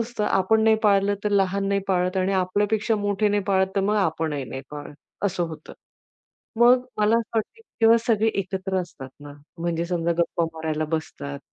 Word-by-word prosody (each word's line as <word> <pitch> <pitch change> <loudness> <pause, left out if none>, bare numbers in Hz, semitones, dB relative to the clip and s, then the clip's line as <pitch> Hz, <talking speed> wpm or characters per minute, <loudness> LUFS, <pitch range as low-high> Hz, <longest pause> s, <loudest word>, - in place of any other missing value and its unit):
असतं, 230 -2 -2
आपण 220 +3 +2
नाही 220 0 +5
पाळलं, 200 -1 +3
तर 210 - +1
लहान 195 0 +1
नाही 200 0 +1
पाळत 180 0 +1
आणि 190 +1 +1
आपल्यापेक्षा 205 +4 +1
मोठे 205 0 0
नाही 205 0 +1
पाळत, 190 -1 +3
तर - - +3
मग 205 +2 +1
आपणही 160 -7 -1
नाही 135 +1 -6
पाळत, 150 0 -8 0.3
असं 185 -3 0
होतं. 155 -1 -10 0.9
मग 245 +1 +6
मला 210 +2 +3
असं 230 -1 -2
वाटतं, 220 - 0
की 230 - -1
ते 230 - +5
सगळे 225 -1 +3
एकत्र 190 0 -3
असतात 155 -7 -9
ना, 145 0 -10 0.3
म्हणजे 170 0 -1
समजा 170 -1 0
गप्पा 170 0 +1
मारायला 160 -1 -2
बसतात. 140 -3 -5
195 Hz, 180 wpm, -24 LUFS, 170-210 Hz, 0.9 s, मग